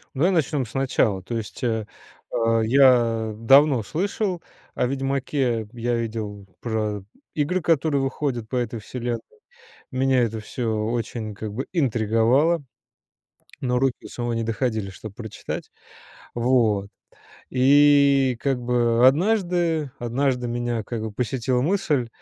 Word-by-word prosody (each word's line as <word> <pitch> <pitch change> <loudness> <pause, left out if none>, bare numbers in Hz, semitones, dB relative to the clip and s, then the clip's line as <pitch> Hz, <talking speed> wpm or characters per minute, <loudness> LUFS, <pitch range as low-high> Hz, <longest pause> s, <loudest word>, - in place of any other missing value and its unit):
Давай 170 +8 +3
начнем 150 -6 +1
сначала. 115 -6 0
То 115 +5 -5
есть, 110 -2 -7
э, 110 -3 -1 0.5
а, 115 0 +2
я 115 -3 +4
давно 135 +2 +5
слышал 185 - -2 0.3
о - - 0
"Ведьмаке". 135 -4 -1
Я 120 0 -1
видел 110 -3 -4 0.2
про 105 -3 -2 0.3
игры, 165 +5 0
которые 155 -3 +2
выходят 135 -4 -2
по 125 - -5
этой 120 -2 -2
вселенной. 120 +2 -4 0.7
Меня 130 -1 +2
это 110 -1 -2
всё 115 +1 -3
очень, 115 -2 -3
как 105 0 -6
бы, 130 +6 -4
интриговало. 130 +4 +2 1.0
Но 125 -1 0
руки 130 -1 -1
у - - -9
самого 120 -1 -3
не 115 0 -1
доходили, 110 -3 -2
чтобы 100 +1 -10
прочитать, 110 -2 -7 0.6
вот. 115 -5 +2 0.6
И, 140 0 +5
как 135 -3 0
бы, 120 0 +2
однажды 170 - +1
однажды 125 +1 0
меня, 120 -2 -2
как 115 0 -5
бы, 110 -1 -4
посетила 125 +2 -1
мысль. 150 -7 +1
125 Hz, 125 wpm, -23 LUFS, 115-140 Hz, 1.0 s, давно